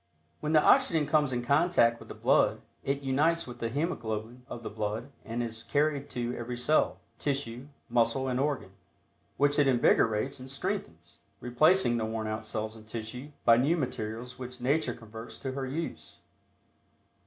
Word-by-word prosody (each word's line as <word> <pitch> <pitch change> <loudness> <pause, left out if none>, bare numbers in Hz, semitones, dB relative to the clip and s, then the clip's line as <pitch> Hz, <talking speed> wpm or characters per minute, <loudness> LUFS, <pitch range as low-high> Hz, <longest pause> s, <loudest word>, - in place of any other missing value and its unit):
When 150 +1 -1
the 155 - +6
oxygen 160 -3 +4
comes 150 -2 +2
in 120 -1 -1
contact 140 -5 +4
with - - -12
the - - -7
blood, - - +3 0.2
it 140 +1 -1
unites 150 +5 +2
with 120 -1 -9
the 115 - -1
hemoglobin 120 -5 -3
of 120 - -7
the - - -4
blood 110 +5 -3
and 115 +1 -3
is 115 -1 -4
carried 145 0 0
to 120 0 -3
every 120 +1 -5
cell, 150 +6 +2 0.2
tissue, 135 -3 -3 0.2
muscle 120 +2 +2
and 125 -1 0
organ, 140 -8 -1 0.7
which 145 +1 +3
it 145 - +5
invigorates 120 0 +3
and 130 +1 -9
strengthens, 135 - -4 0.2
replacing 125 +2 +3
the 110 - -1
worn 110 0 -3
out 110 0 -3
cells 110 0 -3
and 110 -1 -14
tissue 115 +5 -6 0.2
by 115 0 +7
new 145 +8 +3
materials 125 -2 -4
which 125 0 -7
Nature 130 0 +1
converts 115 +1 -10
to 135 - -4
her 135 0 -3
use. 160 +5 -5
125 Hz, 165 wpm, -30 LUFS, 115-140 Hz, 0.7 s, by